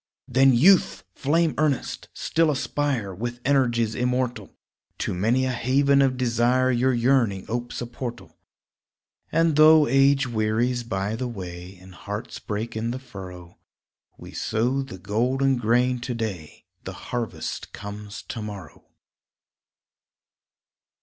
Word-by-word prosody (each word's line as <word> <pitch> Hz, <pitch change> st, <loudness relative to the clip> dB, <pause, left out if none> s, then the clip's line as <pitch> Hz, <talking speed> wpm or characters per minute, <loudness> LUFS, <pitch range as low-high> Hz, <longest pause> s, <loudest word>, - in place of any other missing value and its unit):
Then, 135 Hz, +2 st, +5 dB
Youth! 185 Hz, +9 st, +4 dB
flame 160 Hz, +3 st, +1 dB
earnest, 150 Hz, -4 st, -1 dB
still 165 Hz, -1 st, +1 dB
aspire; 140 Hz, -7 st, -1 dB
With 120 Hz, +5 st, -5 dB
energies 120 Hz, -5 st, +2 dB
immortal, 125 Hz, -3 st, -1 dB, 0.5 s
To -, -, -2 dB
many 115 Hz, +8 st, +1 dB
a 130 Hz, -, 0 dB
haven 140 Hz, +3 st, +3 dB
of 130 Hz, -2 st, +2 dB
desire 125 Hz, +1 st, +2 dB
Your 125 Hz, +2 st, +2 dB
yearning 120 Hz, -5 st, +1 dB
opes 120 Hz, +2 st, -4 dB
a -, -, -2 dB
portal. 120 Hz, 0 st, -7 dB, 1.0 s
And 165 Hz, -2 st, +2 dB
though 155 Hz, 0 st, +7 dB
age 135 Hz, +1 st, +4 dB
wearies 120 Hz, +2 st, 0 dB
by 105 Hz, -2 st, -3 dB
the 125 Hz, +2 st, -3 dB
way, 90 Hz, -4 st, -8 dB
And 95 Hz, +1 st, -15 dB
hearts 105 Hz, +6 st, -6 dB
break 110 Hz, +2 st, -4 dB
in 110 Hz, +1 st, -2 dB
the 125 Hz, -, -3 dB
furrow, 90 Hz, -8 st, -11 dB, 0.6 s
We -, -, -11 dB
sow 125 Hz, +5 st, -1 dB
the 135 Hz, -8 st, -8 dB
golden 125 Hz, +8 st, +1 dB
grain 125 Hz, +2 st, +2 dB
to 120 Hz, 0 st, -4 dB
day 100 Hz, -9 st, -6 dB, 0.2 s
The -, -, -6 dB, 0.2 s
harvest 120 Hz, -2 st, -4 dB
comes 105 Hz, 0 st, -8 dB
to 115 Hz, -, -6 dB
morrow. 100 Hz, -7 st, -9 dB
120 Hz, 130 wpm, -24 LUFS, 105-130 Hz, 1.0 s, though